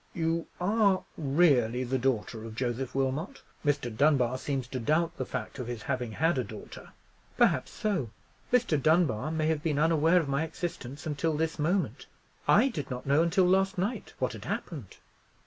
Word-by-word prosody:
"You 165 Hz, 0 st, -1 dB
are 200 Hz, 0 st, +2 dB
really 135 Hz, -6 st, +3 dB
the 130 Hz, +1 st, -1 dB
daughter 115 Hz, -3 st, -1 dB
of 110 Hz, -1 st, -8 dB
Joseph 125 Hz, +2 st, -2 dB
Wilmot? 135 Hz, -, -2 dB, 0.2 s
Mr. 140 Hz, -6 st, 0 dB
Dunbar 130 Hz, -2 st, +3 dB
seems 135 Hz, -3 st, -2 dB
to 130 Hz, -, -3 dB
doubt 165 Hz, +7 st, +1 dB
the -, -, -3 dB
fact -, -, -5 dB
of 125 Hz, -, -4 dB
his 120 Hz, -3 st, -5 dB
having 125 Hz, -4 st, -2 dB
had 160 Hz, +2 st, +1 dB
a -, -, 0 dB
daughter." 110 Hz, -2 st, -10 dB, 0.5 s
"Perhaps -, -, +3 dB
so. 190 Hz, -, -1 dB, 0.4 s
Mr. 225 Hz, -, +2 dB
Dunbar 155 Hz, -5 st, +2 dB
may 160 Hz, -1 st, -1 dB
have 155 Hz, -1 st, +1 dB
been 150 Hz, -2 st, 0 dB
unaware 160 Hz, +2 st, +4 dB
of 160 Hz, -, -2 dB
my 140 Hz, +2 st, 0 dB
existence 160 Hz, -3 st, -6 dB
until 155 Hz, +1 st, -1 dB
this 160 Hz, +1 st, -1 dB
moment. 155 Hz, -, 0 dB, 0.4 s
I 250 Hz, +6 st, +5 dB
did 150 Hz, -, -5 dB
not 125 Hz, -1 st, -5 dB
know 140 Hz, +3 st, +4 dB
until 175 Hz, +3 st, +3 dB
last 190 Hz, +1 st, +2 dB
night 200 Hz, +7 st, -2 dB
what -, -, -1 dB
had -, -, -9 dB
happened." 140 Hz, -, -5 dB
150 Hz, 175 wpm, -29 LUFS, 130-170 Hz, 0.5 s, I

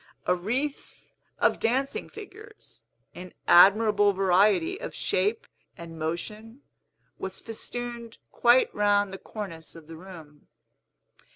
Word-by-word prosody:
A -, -, +3 dB
wreath 250 Hz, +11 st, -4 dB, 0.3 s
of -, -, +2 dB
dancing 265 Hz, +4 st, -1 dB
figures, 430 Hz, +1 st, -13 dB, 0.3 s
in 180 Hz, 0 st, -11 dB
admirable 205 Hz, +2 st, +6 dB
variety 190 Hz, -1 st, +2 dB
of -, -, -7 dB
shape 200 Hz, +4 st, -1 dB, 0.3 s
and 165 Hz, -1 st, -10 dB
motion, 210 Hz, -, -5 dB, 0.6 s
was 190 Hz, 0 st, -5 dB
festooned 235 Hz, 0 st, -7 dB
quite 240 Hz, +2 st, +3 dB
round 205 Hz, -1 st, +1 dB
the 195 Hz, -, -7 dB
cornice 170 Hz, -8 st, -8 dB
of 165 Hz, -2 st, -13 dB
the 165 Hz, +1 st, -11 dB
room. 160 Hz, -5 st, -13 dB
205 Hz, 110 wpm, -26 LUFS, 180-235 Hz, 0.6 s, admirable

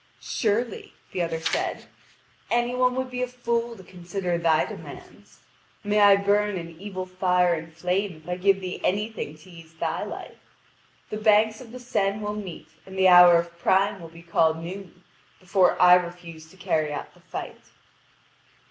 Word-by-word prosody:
"Surely," 225 Hz, 0 st, -2 dB, 0.2 s
the 180 Hz, -, -2 dB
other 165 Hz, -1 st, -2 dB
said, 160 Hz, -, -2 dB, 0.6 s
"any 240 Hz, +1 st, +1 dB
one 250 Hz, 0 st, +2 dB
would 260 Hz, 0 st, -3 dB
be 250 Hz, 0 st, -3 dB
a 250 Hz, -, 0 dB
fool 235 Hz, -1 st, -2 dB
to 190 Hz, -, -13 dB
consider 180 Hz, 0 st, -4 dB
thy 165 Hz, -2 st, +2 dB
demands. -, -, -12 dB, 0.4 s
May 205 Hz, 0 st, +1 dB
I 205 Hz, -1 st, +7 dB
burn 205 Hz, 0 st, +1 dB
in 170 Hz, -1 st, -7 dB
evil 190 Hz, -2 st, -5 dB
fire 180 Hz, -1 st, +2 dB
and 165 Hz, 0 st, -5 dB
flame 180 Hz, +3 st, -2 dB
if -, -, -19 dB
I 180 Hz, -, -2 dB
give 195 Hz, +1 st, +2 dB
thee 185 Hz, -1 st, -5 dB
anything 205 Hz, -6 st, -2 dB
to 155 Hz, +4 st, -17 dB
ease 165 Hz, -1 st, -15 dB
thy 165 Hz, 0 st, -2 dB
life! -, -, -10 dB, 0.6 s
The 215 Hz, -, -3 dB
banks 215 Hz, +1 st, +3 dB
of 235 Hz, -3 st, -12 dB
the 250 Hz, -, -9 dB
Seine 205 Hz, -4 st, -1 dB
will 210 Hz, 0 st, -3 dB
meet, 195 Hz, -6 st, -8 dB, 0.2 s
and 190 Hz, 0 st, -9 dB
the 190 Hz, 0 st, +5 dB
hour 180 Hz, -1 st, +9 dB
of 170 Hz, 0 st, -4 dB
prime 195 Hz, +2 st, +2 dB
will 165 Hz, -, -9 dB
be 170 Hz, +1 st, -15 dB
called 160 Hz, -1 st, +2 dB
noon, 180 Hz, +1 st, -9 dB, 0.4 s
before 185 Hz, 0 st, +2 dB
I 180 Hz, 0 st, +8 dB
refuse 170 Hz, -3 st, -2 dB
to 190 Hz, -, -19 dB
carry 160 Hz, -5 st, -1 dB
out 145 Hz, -, -6 dB
the -, -, -22 dB
fight." -, -, -7 dB
185 Hz, 175 wpm, -25 LUFS, 170-210 Hz, 0.6 s, hour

